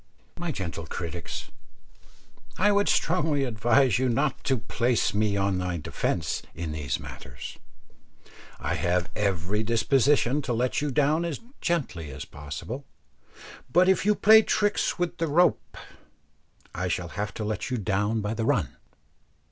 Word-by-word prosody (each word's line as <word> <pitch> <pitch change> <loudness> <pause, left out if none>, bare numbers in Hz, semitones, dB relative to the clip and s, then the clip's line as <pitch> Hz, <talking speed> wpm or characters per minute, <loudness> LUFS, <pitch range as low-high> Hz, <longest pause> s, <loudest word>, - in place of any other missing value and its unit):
My 175 -1 -2
gentle 85 - -5
critics, 85 0 -5 1.1
I 205 +2 +4
would 205 0 +2
strongly 155 -5 +2
advise 120 +1 +3
you 130 -1 +2
not 140 +5 0
to 135 -2 +2
place 120 +1 0
me 105 -1 +1
on 95 -1 +1
my 90 -1 -2
defence 75 - -2
in 80 0 -4
these 75 -5 -2
matters; 60 +1 -9 1.0
I - - -2
have 90 0 0
every 100 0 0
disposition 130 +4 +2
to 125 - -2
let 125 +4 0
you 150 - 0
down 150 +4 +2
as 170 -4 -3 0.2
gently 125 - -1
as 70 +1 -7
possible, 75 - -7 0.9
but 180 +5 +5
if 190 -2 +3
you 210 +1 +3
play 220 +2 +7
tricks 205 -1 +1
with 175 -1 -2
the 165 - +1
rope, 175 +4 +2 1.0
I 95 +2 -2
shall 90 -1 -2
have 105 +2 -3
to 110 - -4
let 110 0 -3
you 125 - -1
down 105 +2 0
by 105 +2 -2
the 115 0 -2
run. 105 - 0
115 Hz, 150 wpm, -27 LUFS, 90-150 Hz, 1.1 s, play